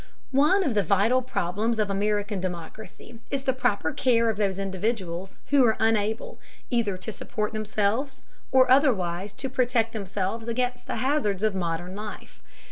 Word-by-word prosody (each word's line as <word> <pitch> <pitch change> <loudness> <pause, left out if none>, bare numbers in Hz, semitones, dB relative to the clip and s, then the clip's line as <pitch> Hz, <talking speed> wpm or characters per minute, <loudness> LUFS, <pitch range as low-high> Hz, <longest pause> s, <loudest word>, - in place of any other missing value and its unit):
One 300 +9 +4
of 280 -9 0
the 210 - +3
vital 210 +6 +3
problems 220 -1 -1
of 210 -2 0
American 205 0 0
democracy 185 +5 -7
is 275 -1 -2
the 260 - +2
proper 210 -10 0
care 230 -3 +3
of 210 - -7
those 195 -3 0
individuals 190 -2 -3
who 280 -2 +6
are 220 -3 +3
unable, 220 0 0 0.3
either 225 -6 +1
to 205 +4 -6
support 210 0 -4
themselves, 215 +5 -1 0.3
or 260 -1 +5
otherwise 200 - +3
to 270 - -4
protect 245 -3 +1
themselves 200 +2 -3
against 245 +1 -2
the - - -2
hazards 250 -8 0
of 215 -1 +2
modern 175 0 -3
life. 210 0 -8
215 Hz, 155 wpm, -26 LUFS, 195-245 Hz, 0.3 s, who